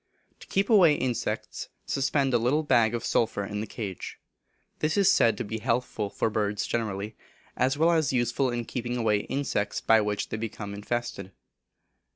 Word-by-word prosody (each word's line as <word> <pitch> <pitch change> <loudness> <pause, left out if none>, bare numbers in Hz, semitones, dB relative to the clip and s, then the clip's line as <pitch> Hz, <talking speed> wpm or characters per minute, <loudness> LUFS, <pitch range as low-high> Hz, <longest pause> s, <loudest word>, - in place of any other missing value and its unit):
To - - -13
keep 195 +1 +1
away 180 -9 +6
insects 125 -3 -3 0.2
suspend 135 0 +1
a 120 - +4
little 135 +7 +1
bag 120 -5 +3
of 120 - -4
sulphur 110 -3 +1
in 105 +1 -4
the 110 - -5
cage. 100 -4 -6 0.6
This 155 +3 0
is 195 -1 +5
said 115 - +4
to - - -2
be 110 +1 -4
healthful 115 -3 -1
for 110 +2 -1
birds 105 -1 -1
generally, 105 -2 -3 0.4
as 130 +3 +1
well 165 +3 +4
as 160 -5 +2
useful 125 +1 +1
in 120 -1 -3
keeping 120 0 -3
away 110 -3 +2
insects 105 -4 -2
by 110 -1 +4
which 105 -1 -2
they - - -3
become 105 -2 -5
infested. 105 -2 -4
120 Hz, 175 wpm, -27 LUFS, 105-135 Hz, 0.6 s, away